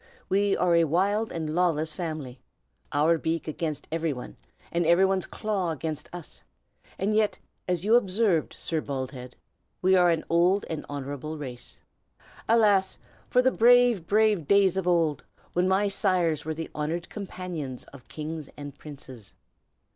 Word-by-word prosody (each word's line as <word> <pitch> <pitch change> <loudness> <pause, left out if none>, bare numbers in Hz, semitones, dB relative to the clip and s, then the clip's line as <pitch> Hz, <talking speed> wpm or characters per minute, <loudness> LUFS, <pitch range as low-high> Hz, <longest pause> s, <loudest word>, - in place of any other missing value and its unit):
We 200 +1 +2
are 180 -1 +2
a 170 0 +5
wild 200 +8 +1
and 160 -2 -3
lawless 160 -3 +1
family, 155 -8 -5 0.5
our 155 +3 +3
beak 165 +1 -2
against 155 -1 -4
every 165 -1 -1
one, 125 - -9 0.4
and 170 0 +1
every 170 +3 +5
one's 190 -1 0
claw 205 -5 -2
against 155 -1 -4
us, 175 -3 -9 0.5
and 200 +3 0
yet, 215 -1 +2 0.3
as 180 0 -1
you 220 - +3
observed, 200 -6 +2
Sir 160 -2 -1
Baldhead, 130 -3 -6 0.4
we 190 +1 +4
are 180 -1 +5
an 165 -2 +1
old 175 +4 +3
and 155 -2 -5
honorable 145 +2 -5
race. 125 -4 -8 0.7
Alas! 205 -4 +4 0.3
for 250 - +3
the 260 - +4
brave, 240 -6 +4
brave 210 -6 +2
days 200 -2 +4
of 190 -2 -2
old, 165 -5 +2 0.3
when 180 +1 +2
my 195 +2 +2
sires 180 -7 +1
were 160 0 -3
the 165 +1 -6
honored 160 +3 -3
companions 180 - -6
of 130 -3 -14
kings 155 -1 -6
and 145 -1 -9
princes! 130 -8 -11
170 Hz, 155 wpm, -27 LUFS, 150-195 Hz, 0.7 s, a